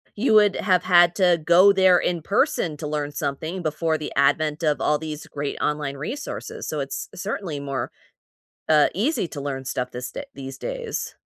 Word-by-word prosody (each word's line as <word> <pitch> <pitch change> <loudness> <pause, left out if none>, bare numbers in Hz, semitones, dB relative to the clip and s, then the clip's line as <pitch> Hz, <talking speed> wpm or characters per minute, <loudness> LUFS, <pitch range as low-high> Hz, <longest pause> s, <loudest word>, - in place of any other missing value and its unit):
you 220 0 +2
would 210 -2 +5
have 185 -3 +2
had 175 -1 +5
to 180 -4 +3
go 185 +4 +6
there 185 -2 +5
in 175 -1 -1
person 165 -3 0
to 150 - -5
learn 150 -1 -2
something 155 +5 -4
before 160 +1 0
the 150 - -6
advent 150 +3 +2
of 150 -2 +1
all 150 0 +1
these 155 -1 -6
great 145 -1 -5
online 150 -2 -2
resources, 260 - -6
so - - -3
it's - - -5
certainly 170 -8 -4
more, 140 -3 -3 0.8
uh, 155 -2 +5
easy 225 - 0
to 145 - -7
learn 135 -1 -4
stuff 125 -1 -3
this 125 +1 -6
da 285 - -6
these 135 0 -8
days. 475 - -4
155 Hz, 180 wpm, -23 LUFS, 145-185 Hz, 0.8 s, go